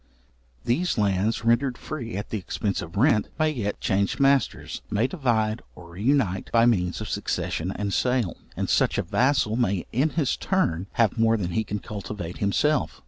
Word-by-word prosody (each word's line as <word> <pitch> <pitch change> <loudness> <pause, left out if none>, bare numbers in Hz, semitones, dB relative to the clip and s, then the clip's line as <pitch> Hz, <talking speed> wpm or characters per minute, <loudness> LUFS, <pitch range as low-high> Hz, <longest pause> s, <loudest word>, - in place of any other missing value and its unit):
These 150 +9 +1
lands, 105 +2 +1
rendered 120 +2 +2
free 120 -9 -5
at 100 - -6
the 110 - -1
expence 100 +2 -2
of 85 +4 -8
rent, 115 -2 +3
may 155 -1 +2
yet 105 -8 -3
change 100 +1 0
masters, 140 0 +1
may 105 +2 +1
divide 120 -8 0
or 85 -1 -13
reunite 105 0 0
by 115 0 +5
means 90 -5 +1
of 110 - -4
succession 90 -4 -2
and 100 -1 -2
sale; 125 -8 +1 0.2
and - - -1
such - - +2
a - - +1
vassal 130 -4 +2
may 100 -7 0
in 135 +7 +2
his 145 -5 +2
turn 95 - 0
have 115 -1 +2
more 115 0 +4
than 90 -4 -3
he 110 +6 0
can 105 - -3
cultivate 100 -4 -6
himself. 145 +9 +1
110 Hz, 175 wpm, -25 LUFS, 100-125 Hz, 0.2 s, by